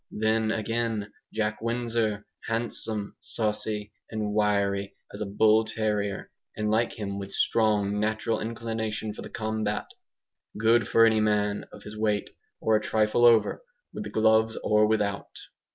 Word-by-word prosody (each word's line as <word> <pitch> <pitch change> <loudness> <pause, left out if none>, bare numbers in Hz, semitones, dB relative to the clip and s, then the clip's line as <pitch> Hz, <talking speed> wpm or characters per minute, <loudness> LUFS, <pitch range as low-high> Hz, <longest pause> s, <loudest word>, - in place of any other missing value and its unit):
Then, 110 +1 +1
again, 110 -1 -2 0.2
Jack 110 0 -2
Windsor, 115 -3 -1 0.2
handsome, 115 -2 -2
saucy, 105 -1 -3 0.2
and 105 -2 -2
wiry 100 -2 +1 0.2
as 100 - -7
a 105 - -2
bull 110 +2 +4
terrier 105 -2 -2 0.3
and 105 0 0
like 115 +2 +2
him 100 -2 -4
with 100 0 -7
strong 105 -2 +2
natural 110 +1 0
inclination 110 -1 -3
for - - -9
the - - -8
combat; 110 -1 -2 0.7
good 115 +2 +3
for 115 - +6
any 110 -1 +4
man 105 -1 +1
of - - -12
his 105 0 -9
weight, 105 -1 0 0.3
or 110 - +2
a 105 - +2
trifle 110 +2 +2
over, 115 - +4 0.3
with - - -5
the 105 - -6
gloves 110 +1 +3
or 105 0 +4
without. 105 -2 -1
110 Hz, 145 wpm, -27 LUFS, 105-110 Hz, 0.7 s, for